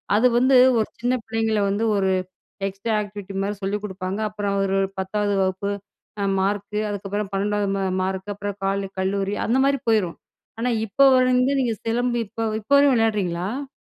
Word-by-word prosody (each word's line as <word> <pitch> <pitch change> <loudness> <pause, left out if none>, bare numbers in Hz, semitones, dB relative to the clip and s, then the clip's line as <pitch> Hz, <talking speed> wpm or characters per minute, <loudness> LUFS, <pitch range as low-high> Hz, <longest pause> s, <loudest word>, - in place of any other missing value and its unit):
அது 240 +4 +5
வந்து 260 +2 +4 0.2
ஒரு 215 - +1
சின்ன 245 +2 +1
பிள்ளைங்களை 225 -1 0
வந்து 205 +3 0
ஒரு 190 -1 +1 0.6
எக்ஸ்ட்ரா 195 +3 -3
ஆக்டிவிட்டி 205 -1 -8
மாதிரி 205 +1 -2
சொல்லிக் 205 +2 -2
குடுப்பாங்க. 190 +1 -4
அப்புறம் 205 -1 -2
ஒரு 195 0 +1 0.2
10வது 205 +2 -1
வகுப்பு 190 +2 -1 0.7
மார்க், 205 +1 -1
அதுக்கப்புறம் 205 0 -3
12வது 205 +1 0
ம 195 - -1 0.2
மார்க், 190 +2 -3
அப்புறம் 205 0 -5
காலே 195 0 -1
கல்லூரி 195 +1 -1
அந்த 240 - +2
மாதிரி 275 -2 +2
போய்ரும். 205 -7 +2 0.4
ஆனா 245 +2 0 0.2
இப்போ 275 +7 +3
வரைந்து 255 +1 +3
நீங்க 235 -3 0
சிலம்பு 240 +2 0
இப்போ 225 +2 -4 0.2
இப்போ 245 - -5
வரையும் 280 -1 +5
விளையாடுறீங்களா? 215 +4 -1
205 Hz, 155 wpm, -23 LUFS, 195-225 Hz, 0.7 s, அது